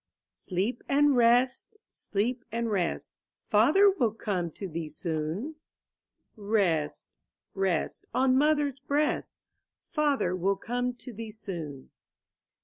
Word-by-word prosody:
if. - - -32
Sleep 200 +7 -2
and 290 0 +4
rest, 245 - +3
sleep 235 +5 -2
and 230 0 -1
rest. 180 -5 -1 0.3
Father 290 - +5
will 365 - +3
come 185 -6 -2
to 195 +5 -7
thee 165 -2 -5
soon; 160 - -3 0.8
Rest, 200 -8 0 0.5
rest 190 -4 -1
on 260 0 +3
mother's 290 -1 +2
breast. 290 +2 0 0.6
Father 290 - +1
will 190 +2 +1
come 245 +4 -2
to 245 0 -10
thee 225 +1 -7
soon. 170 -11 -7
225 Hz, 115 wpm, -28 LUFS, 185-265 Hz, 0.8 s, Father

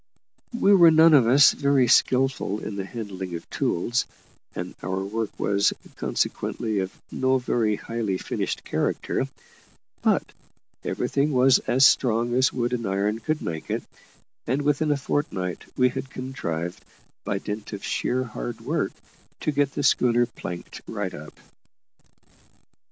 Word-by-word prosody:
We 205 -4 +5
were 170 -4 +8
none 160 0 +6
of 130 -6 +6
us 140 +4 +7
very 140 -3 +2
skilful 130 -4 +2
in 105 -1 -6
the 100 -1 -3
handling 95 -6 -6
of 85 - -8
tools, 120 +9 0 0.5
and - - -5
our 95 +2 -2
work 110 +1 -2
was, 100 0 +2 0.2
consequently, 110 -3 -1
of 95 0 -4
no 130 0 +2
very 115 -4 0
highly 110 -4 -3
finished - - -3
character; - - -1 0.7
but - - +1 0.5
everything 140 +2 0
was 130 +1 +5
as 130 +2 +5
strong 120 -2 +3
as 130 +1 +3
wood 120 -1 -1
and 115 -3 -2
iron 100 +3 0
could 155 +6 -2
make 80 -2 -5
it, - - -2 0.6
and 135 +4 0
within 145 +2 +1
a 145 - +2
fortnight 100 - -2
we 125 0 +4
had 130 +2 -5
contrived, 90 -9 -5 0.4
by 100 - -1
dint 105 +1 -6
of 100 -2 -6
sheer 130 +1 -1
hard - - -6
work, - - -1 0.5
to 155 - 0
get 145 -1 +1
the 145 - -2
schooner 120 -2 +3
planked 90 -7 -8
right 100 -4 -4
up. 75 +1 -10
120 Hz, 145 wpm, -25 LUFS, 100-135 Hz, 0.7 s, were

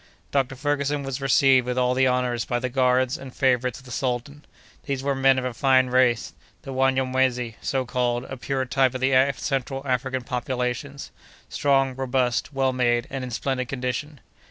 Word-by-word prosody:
Dr. 135 -2 0
Ferguson 145 +1 -1
was 135 0 -4
received 135 -1 +4
with 125 0 -2
all 125 0 +2
the 130 +1 +3
honors 125 -2 0
by 120 - -2
the 125 +1 -2
guards 130 +1 +2
and 135 -1 -9
favorites 125 -2 +1
of 130 - -15
the 125 - -11
sultan; 130 +4 -3 0.4
these 135 -2 -3
were 140 0 +1
men 135 0 +3
of 130 - -1
a 125 - -2
fine 130 0 +3
race, 125 -2 +2 0.3
the 135 -3 -7
Wanyamwezi 130 -2 +1
so 135 -2 -1
called, 120 0 -1
a 130 - -7
pure 130 +1 -2
type 130 0 +1
of 130 - -4
the 135 +1 +2 0.2
central 135 0 -3
African 130 0 -1
populations, 125 +2 -3 0.4
strong, 135 -2 +2
robust, 130 0 0
well 135 -2 0
made, 120 -2 +1
and 135 -1 -4
in 125 - -5
splendid 130 +1 -2
condition. 135 +3 -4
130 Hz, 180 wpm, -24 LUFS, 125-135 Hz, 0.4 s, received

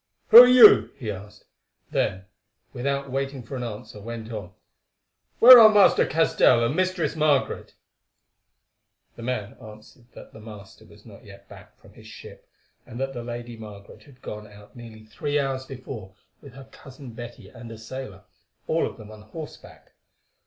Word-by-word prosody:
"Who 235 - +11
are 250 - +7
you?" 250 -4 +7
he 115 -6 -6
asked; 105 +1 -12 0.5
then, 95 0 -2 0.5
without 140 +1 -4
waiting 135 -1 -4
for 125 +5 -9
an 125 - -5
answer, 110 -2 -9
went 115 +1 -9
on, 100 -5 -8 0.9
"Where 250 +1 +10
are 220 -1 +8
Master 205 -2 +4
Castell 155 -7 +2
and 125 +6 -2
Mistress 185 -2 -2
Margaret?" 150 -3 -1 1.4
The - - -12
man 115 -3 -5
answered 110 +3 -16
that - - -15
the - - -13
master 105 -2 -14
was - - -20
not - - -16
yet - - -16
back - - -17
from - - -21
his - - -17
ship, - - -14 0.3
and 120 - -11
that 135 0 -4
the 120 - -7
Lady 120 0 -8
Margaret 105 -2 -13
had 135 -3 -21
gone 105 0 -9
out 105 0 -18
nearly 115 -2 -13
three 145 +7 -4
hours 135 -2 -3
before 120 -7 -10 0.3
with 140 -3 -15
her 135 -1 -13
cousin 135 -1 -13
Betty 120 0 -11
and 115 -1 -13
a 115 - -10
sailor—all 110 -3 -7
of - - -11
them 110 0 -13
on 110 -1 -14
horseback. 150 +9 -13
120 Hz, 165 wpm, -23 LUFS, 110-135 Hz, 1.4 s, Who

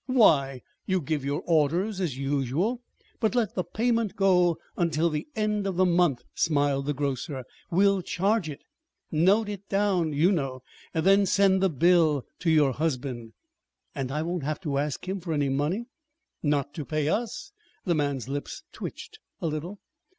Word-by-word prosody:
"Why, 140 - +4 0.2
you 185 -1 +2
give 155 -2 -2
your 140 +1 -2
orders 175 +6 +1
as 155 -8 -2
usual, 140 - -1 0.4
but 225 0 +1
let 230 -4 +1
the 180 - -1
payment 230 -2 0
go 180 -4 +3 0.2
until 170 -1 +1
the 150 -1 -3
end 210 -2 0
of 190 - -2
the 185 +1 +4
month," 170 -8 +2
smiled 145 -3 +1
the 145 - +1
grocer. 135 0 -3 0.3
"We'll 195 +2 +3
charge 195 0 0
it 145 0 -8 0.5
note 190 +8 +3
it 200 -1 -7
down, 195 -5 +1
you 155 +6 +3
know 135 -7 -2 0.3
then 195 +4 +4
send 195 -1 +3
the 190 - +3
bill 160 -2 +3
to 175 - 0
your 150 -4 +4
husband." 130 -5 -3 0.6
"And 135 -3 -3
I 150 +2 -1
won't 175 +1 -2
have 150 +2 -2
to 145 -6 -1
ask 145 +2 -3
him 190 +1 -2
for 170 -2 -4
any 145 -2 +1
money?" 150 - -1 0.6
"Not 145 -2 0
to 150 - -5
pay 155 +1 -1
us." 225 +7 -2 0.3
The 175 - +2
man's 140 -5 -1
lips 140 +1 -5
twitched 435 - -8 0.2
a - - -4
little. 165 +6 -4
165 Hz, 165 wpm, -27 LUFS, 145-195 Hz, 0.6 s, Why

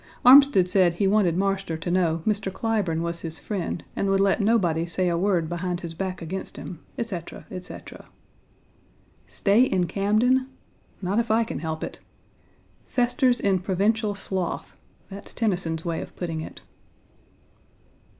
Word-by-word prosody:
Armsted 260 -8 +8
said 180 -2 +3
he 200 - 0
wanted 195 -4 +3
Marster 195 -3 -1
to 175 +2 -4
know 165 -3 +1
Mr. 205 -2 0
Clyburne 195 -7 -1
was 170 0 -3
his 160 -1 -5
friend 185 -5 -4
and 200 - 0
would 195 0 +3
let 195 +2 +3
nobody 175 -7 +2
say 180 +1 0
a 170 - 0
word 175 -2 +1
behind 175 +1 -3
his 170 -1 -6
back 185 +1 -4
against 185 +4 -5
him, 175 - -8 0.2
etc., 195 -8 -5
etc. 180 0 -8 1.2
Stay 205 +4 +2
in 190 -8 +2
Camden? 220 +8 +2 0.6
Not 195 +5 +1
if 235 - -1
I 225 +1 +3
can 225 - -5
help 160 0 -4
it. - - -6 0.9
"Festers 245 0 +2
in 195 -2 +2
provincial 205 +3 0
sloth" 190 -3 -3 0.4
that's 195 +1 -9
Tennyson's 175 -7 -1
way 165 -1 -2
of - - -10
putting 165 -3 -4
it. - - -9
190 Hz, 150 wpm, -25 LUFS, 170-210 Hz, 1.2 s, Armsted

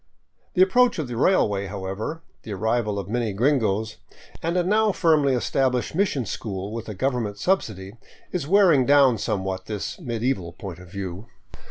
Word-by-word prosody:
The 185 - +7
approach 245 +6 +3
of 155 -5 -2
the 120 - -5
railway, 105 - +2
however, 100 - -5 0.2
the 105 - -7
arrival 110 +1 0
of 100 -2 -4
many 115 -1 -1
gringos, 110 -4 +1 0.4
and 170 +2 -1
a 180 - +3
now 210 +3 +3
firmly 155 -7 +3
established 125 -1 0
mission 160 - 0
school 100 -1 -5
with 115 -1 -6
a 105 - -5
govern 125 +2 0
ment 100 0 -6
subsidy 105 - -1 0.3
is 170 -6 -3
wearing 170 -8 +5
down 140 -5 +5
somewhat 95 -3 -3
this 105 - -4
medieval 115 - -2
point 90 -1 -8
of 90 -1 -13
view. 95 +2 -6
115 Hz, 165 wpm, -24 LUFS, 100-150 Hz, 0.4 s, The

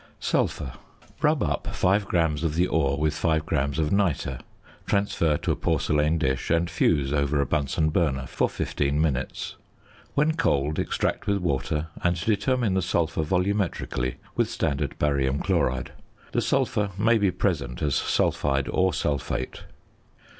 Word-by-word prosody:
~Sulphur.~ 70 -5 -1 0.5
Rub - - +3
up - - -2
5 100 +2 +2
grams 80 -4 +1
of 80 -2 0
the 90 +2 +3
ore 70 -6 +1
with 75 +1 +1
5 80 -1 0
grams 70 -3 0
of 75 -2 0
nitre, 85 -10 0 0.5
transfer 85 -6 +1
to - - -1
a - - +1
porcelain 75 +2 +1
dish, 65 -5 -1
and 85 0 +1
fuse 70 -1 +2
over 70 0 +1
a 70 - +2
Bunsen 75 +2 0
burner 70 -5 +1
for - - 0
fifteen 70 0 -1
minutes. 70 -5 -2 0.6
When 150 +2 +3
cold, 75 - +1
extract - - -1
with 100 - +2
water, 75 -2 -1
and 90 -1 +1
determine 115 0 +1
the 95 - +2
sulphur 85 -3 0
volumetrically 90 - -1 0.2
with - - +1
standard 70 -3 -2
barium 70 -2 +1
chloride. 65 0 0 0.4
The - - +1
sulphur 105 -1 +1
may 115 +2 +3
be 100 -2 +3
present 80 -9 -1
as 75 -2 +1
sulphide 70 +1 +1
or 95 -3 +2
sulphate. 70 -3 -2
80 Hz, 145 wpm, -26 LUFS, 70-90 Hz, 0.6 s, Rub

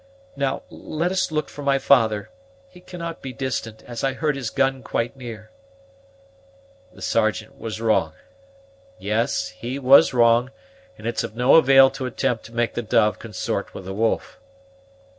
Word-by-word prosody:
"Now, 135 -1 -2
let 170 +3 -3
us 190 -3 0
look 155 -1 -1
for 145 - -10
my 140 -1 +2
father; 110 -6 +2 0.4
he 180 - -17
cannot 170 -2 -7
be 135 - -6
distant, 115 -3 -4
as 120 -1 -7
I 135 -1 +1
heard 150 +2 -1
his 130 -5 -3
gun 135 0 0
quite 115 -1 -2
near." 115 -4 -9 1.4
"The - - -12
Sergeant - - -1
was 110 -1 -5
wrong 105 -8 +1 0.8
yes, 105 -3 -1
he 115 +9 -6
was 135 0 +6
wrong, 120 0 +4 0.5
and 110 - -12
it's 115 0 -1
of - - -6
no 125 +3 +3
avail 135 -3 +7
to 130 - -4
attempt 120 -1 -2
to - - -12
make 120 0 0
the - - -2
dove 110 -2 +2
consort 110 -2 -4
with 95 - -8
the 95 - -5
wolf." 110 +3 -1
120 Hz, 160 wpm, -23 LUFS, 110-135 Hz, 1.4 s, avail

